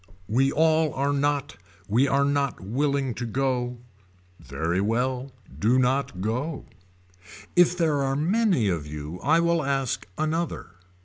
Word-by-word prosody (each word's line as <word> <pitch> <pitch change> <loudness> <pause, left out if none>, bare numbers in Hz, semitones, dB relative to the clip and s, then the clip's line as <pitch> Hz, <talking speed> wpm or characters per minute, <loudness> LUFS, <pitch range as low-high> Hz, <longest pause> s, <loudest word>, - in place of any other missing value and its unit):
We 135 +5 +2
all 160 -1 +2
are 140 +2 0
not 145 -2 -1 0.3
we 120 +7 +3
are 140 +1 +2
not 140 -1 0
willing 135 +5 -1
to 120 - -5
go. 125 0 -1 0.6
Very 85 +4 -2
well 125 +5 -1 0.3
do 115 +5 +3
not 130 -6 0
go. 125 +9 -2 0.9
If 175 0 +5
there 155 -5 +1
are 135 0 0
many 180 - +2
of 85 -6 -1
you 75 +3 -7
I 160 +5 +3
will 170 -1 +2
ask 135 -2 -1
another. 160 - -2
135 Hz, 135 wpm, -25 LUFS, 120-150 Hz, 0.9 s, If